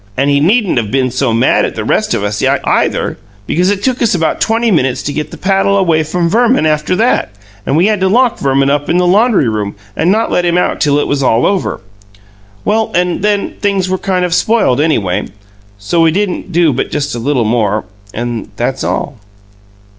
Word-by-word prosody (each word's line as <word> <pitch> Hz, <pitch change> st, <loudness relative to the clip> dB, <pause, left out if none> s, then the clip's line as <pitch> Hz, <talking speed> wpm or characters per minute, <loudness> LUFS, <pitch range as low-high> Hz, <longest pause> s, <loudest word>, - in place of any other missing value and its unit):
And 140 Hz, +2 st, +1 dB
he 140 Hz, -, +3 dB
needn't 190 Hz, -, +2 dB
of 110 Hz, -3 st, -4 dB
been 130 Hz, 0 st, 0 dB
so 130 Hz, 0 st, 0 dB
mad 115 Hz, +1 st, +2 dB
at -, -, -3 dB
the -, -, -3 dB
rest -, -, 0 dB
of -, -, -2 dB
us, 105 Hz, 0 st, -2 dB
either, -, -, 0 dB, 0.3 s
because 180 Hz, -, +1 dB
it 200 Hz, 0 st, -1 dB
took 255 Hz, -1 st, -1 dB
us 230 Hz, -5 st, +2 dB
about 165 Hz, -2 st, -1 dB
twenty 225 Hz, +1 st, +1 dB
minutes 135 Hz, -8 st, 0 dB
to 145 Hz, -, -3 dB
get 150 Hz, 0 st, -3 dB
the -, -, -10 dB
paddle 195 Hz, +1 st, +1 dB
away 170 Hz, -5 st, +2 dB
from 170 Hz, +2 st, -1 dB
Verman 230 Hz, 0 st, +2 dB
after 155 Hz, +3 st, 0 dB
that, 230 Hz, +6 st, +1 dB, 0.4 s
and 140 Hz, -, +1 dB
we 170 Hz, -, +3 dB
had 210 Hz, -1 st, +1 dB
to 190 Hz, -, +1 dB
lock 240 Hz, +4 st, +2 dB
Verman 135 Hz, 0 st, +1 dB
up 145 Hz, 0 st, -1 dB
in 175 Hz, -, +2 dB
the 180 Hz, -, +2 dB
laundry 205 Hz, -, +3 dB
room 105 Hz, -2 st, -3 dB, 0.2 s
and 175 Hz, -, +1 dB
not 220 Hz, +3 st, 0 dB
let 180 Hz, -, +1 dB
him 175 Hz, 0 st, +1 dB
out 180 Hz, -, 0 dB
till 145 Hz, -1 st, +2 dB
it 145 Hz, -, +1 dB
was 145 Hz, -1 st, -1 dB
all 120 Hz, -3 st, +2 dB
over. 195 Hz, -2 st, -1 dB, 0.8 s
Well, 220 Hz, +1 st, +1 dB
and 180 Hz, 0 st, 0 dB
then 205 Hz, 0 st, 0 dB
things 195 Hz, -3 st, 0 dB
were 185 Hz, -, -1 dB
kind 185 Hz, -2 st, 0 dB
of 175 Hz, -, -2 dB
spoiled, 185 Hz, -, +2 dB
anyway; 110 Hz, -, 0 dB, 0.5 s
so 105 Hz, +12 st, -1 dB
we 165 Hz, -, +4 dB
didn't 190 Hz, +1 st, -2 dB
do 170 Hz, -3 st, +2 dB
but 125 Hz, -, -2 dB
just 145 Hz, -1 st, -3 dB
a 120 Hz, -, -4 dB
little 125 Hz, -1 st, 0 dB
more 110 Hz, -2 st, 0 dB, 0.3 s
and 120 Hz, 0 st, -4 dB
that's 130 Hz, +2 st, -2 dB
all." 140 Hz, -5 st, -3 dB
165 Hz, 215 wpm, -13 LUFS, 135-195 Hz, 0.8 s, we